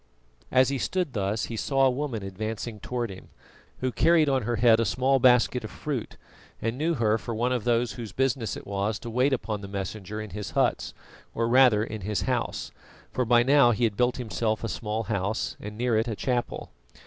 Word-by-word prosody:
As 130 0 +4
he 135 -1 -1
stood 180 0 -1
thus 100 +1 -1
he 115 - -6
saw 135 +4 +2
a 130 - +4
woman 125 -5 -3
advancing 110 +3 -5
towards 120 -2 -3
him, 95 - -13 0.5
who 130 0 0
carried 160 +6 +4
on 135 -2 +2
her 120 +2 -1
head 115 0 +5
a - - +3
small 130 +6 +2
basket 125 -1 +4
of 110 - -6
fruit, 140 -7 -5 0.4
and 115 +1 -2
knew 160 +5 0
her 110 -3 +2
for 115 - -5
one 120 +3 0
of 125 -3 -1
those 120 0 +2
whose 115 -5 -7
business 130 -1 -1
it - - -10
was 100 +1 -1
to 115 - -8
wait 130 +4 +2
upon 110 -5 -2
the 100 - -7
Messenger 100 +1 -5
in 110 -2 -7
his 105 +1 -5
huts, - - +1 0.4
or 115 0 +1
rather 120 -3 +5
in 110 -1 -6
his 100 -1 -2
house, - - -2 0.4
for 125 - 0
by 120 +1 +5
now 135 -1 +5
he 120 +1 0
had 110 -3 +2
built 125 +3 +1
himself 110 -2 -2
a - - -1
small 110 +1 -3
house, 100 0 -2
and 105 +1 -8
near 120 -1 +1
it 110 +2 +1
a 110 - -2
chapel. 125 +1 -2
115 Hz, 210 wpm, -27 LUFS, 105-125 Hz, 0.5 s, head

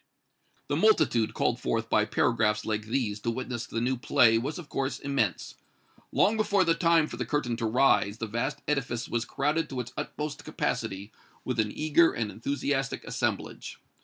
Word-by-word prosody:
The - - 0
multitude 120 - +3
called 120 - +1
forth 115 -2 -1
by 105 -1 +3
paragraphs 105 -1 +1
like 110 0 -2
these 110 -3 -1
to 115 - -2
witness 120 -1 -4
the 115 - -3
new 125 +2 0
play 120 -3 +4
was, 140 +6 -4
of 175 -4 -8
course, 135 0 -2
immense. 140 -9 -1 0.6
Long 220 +2 +3
before 205 -3 +3
the 165 -2 +3
time 165 -1 +3
for 120 - -8
the 125 - -1
curtain 120 -1 -1
to 115 -1 -1
rise, 110 -3 +3
the 115 - -3
vast 115 +6 -3
edifice 125 -5 -1
was 120 0 -1
crowded 150 +5 -1
to 130 - -4
its 120 -1 -5
utmost 150 -1 -5
capacity 100 +2 -3 0.3
with 125 -2 -2
an 105 -1 +1
eager 155 +5 +3
and 110 -3 -2
enthusiastic 140 +2 -2
assemblage. - - -3
125 Hz, 175 wpm, -28 LUFS, 115-145 Hz, 0.6 s, play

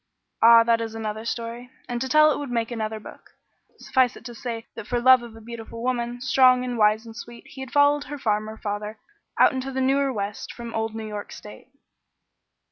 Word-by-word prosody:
Ah, 230 0 +8
that 230 0 +2
is 225 -1 -5
another 220 0 -4
story, 235 +1 -5 0.2
and 240 -1 -3
to 265 - -2
tell 305 +3 +6
it - - -2
would 290 -2 -5
make 230 -1 -1
another 220 -2 -3
book; - - -14 0.4
suffice 255 -2 +1
it - - -14
to 240 - -7
say 230 -1 -6
that 230 - -9
for 245 - 0
love 255 +1 +6
of 235 -2 -11
a 225 - -12
beautiful 230 0 -8
woman, 245 -1 -2
strong 255 -1 +4
and 245 -1 -3
wise 215 0 +3
and 225 -1 -11
sweet, 235 0 -10
he 265 - -11
had 265 - -6
followed 285 +1 +3
her 290 +2 -6
farmer 215 -3 -1
father 210 +1 -5 0.4
out - - +5
into 265 +1 -4
the 265 - -3
newer 270 +1 +2
west 205 -3 -4
from 235 -1 -8
old 225 0 -2
New 220 -1 -5
York 210 -1 -6
State. 210 - -12
235 Hz, 210 wpm, -24 LUFS, 220-255 Hz, 0.4 s, Ah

